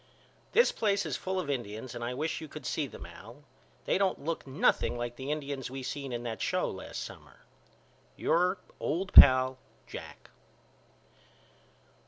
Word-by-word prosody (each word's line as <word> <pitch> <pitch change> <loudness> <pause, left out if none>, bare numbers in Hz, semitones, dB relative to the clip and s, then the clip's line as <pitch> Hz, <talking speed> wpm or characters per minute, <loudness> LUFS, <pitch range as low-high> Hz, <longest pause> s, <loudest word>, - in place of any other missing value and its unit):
This 475 - +5
place 200 -2 +1
is - - -2
full 190 0 -2
of 180 - -3
Indians 120 -3 -4
and 120 -1 -6
I 120 +1 -3
wish 155 +4 -2
you 160 - -7
could 155 +1 -10
see 150 -3 -1
them 100 - -10
Al. 110 - -13 0.4
They - - +2
don't 190 -7 0
look 165 -3 -3
nothing 130 -2 +2
like 120 0 -4
the 130 +2 -6
Indians 140 -4 -3
we 135 +1 -6
seen 135 +1 -4
in 120 0 -3
that 115 -2 -4
show - - 0
last - - -6
summer. - - -12 0.7
Your 180 +3 +2 0.2
old 190 +5 -2
pal, 130 0 +9 0.3
JACK. - - -10
135 Hz, 160 wpm, -30 LUFS, 120-165 Hz, 0.7 s, pal